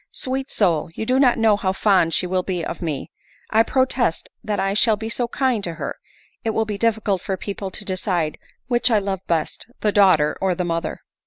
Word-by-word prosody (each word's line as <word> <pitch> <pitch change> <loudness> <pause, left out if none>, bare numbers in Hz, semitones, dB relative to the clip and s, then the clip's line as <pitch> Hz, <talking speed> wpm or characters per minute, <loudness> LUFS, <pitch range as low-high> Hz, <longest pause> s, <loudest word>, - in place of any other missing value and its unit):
Sweet 265 +1 -3
soul! 170 -7 +1
you 220 - -3
do 255 +3 +2
not 255 -3 +4
know 225 -2 +4
how 190 -2 -1
fond 190 -4 +3
she 180 - +1
will 185 +1 0
be 180 -2 -3
of 170 - -5
me! 155 -5 -4 0.4
I 220 - +5
protest 255 -6 +1
that 210 -1 -2
I 195 0 +1
shall 215 +1 +4
be 220 +2 -5
so 240 +1 -1
kind 245 -3 0
to 170 -3 -3
her, - - -5 0.4
it 225 -2 -1
will 220 - +2
be 210 -2 -4
difficult 220 -5 +1
for 190 0 -3
people 200 0 -5
to 205 +3 -7
decide 180 -5 -1 0.3
which 240 0 +2
I 225 - +4
love 195 -2 -2
best, 165 +3 -1
the 210 - +2
daughter 185 -8 +4
or 190 -2 +1
the 180 0 -2
mother." 165 -1 -3
200 Hz, 215 wpm, -22 LUFS, 180-225 Hz, 0.4 s, I